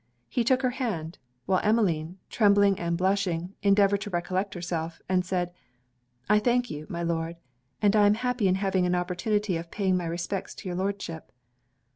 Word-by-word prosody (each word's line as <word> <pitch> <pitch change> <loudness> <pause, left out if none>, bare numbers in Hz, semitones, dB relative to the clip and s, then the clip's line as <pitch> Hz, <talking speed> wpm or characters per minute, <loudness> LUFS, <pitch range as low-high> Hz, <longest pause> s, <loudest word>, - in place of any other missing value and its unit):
He 240 - 0
took 260 +2 +2
her 255 - +2
hand; 205 - -4 0.3
while 185 -1 +2
Emmeline, 185 -6 +1
trembling 200 -2 +4
and 170 0 -1
blushing, 185 -1 0
endeavoured 200 0 +4
to 210 - -5
recollect 185 +2 -2
herself, 170 -2 -4
and 185 -1 +2
said 180 -1 -2 0.7
'I 210 +1 +5
thank 245 +2 +1
you, 150 +1 -6
my 170 0 -3
Lord, 165 0 -2 0.5
and 205 0 +4
I 205 -1 +6
am 205 - +4
happy 250 -2 0
in 185 - +3
having 190 -2 +1
an 180 - +1
opportunity 180 +2 0
of 165 0 -7
paying 190 -1 0
my 175 -2 -1
respects 175 +3 -4
to - - -9
your 180 - -3
Lordship.' 190 -4 -4
190 Hz, 175 wpm, -27 LUFS, 175-205 Hz, 0.7 s, I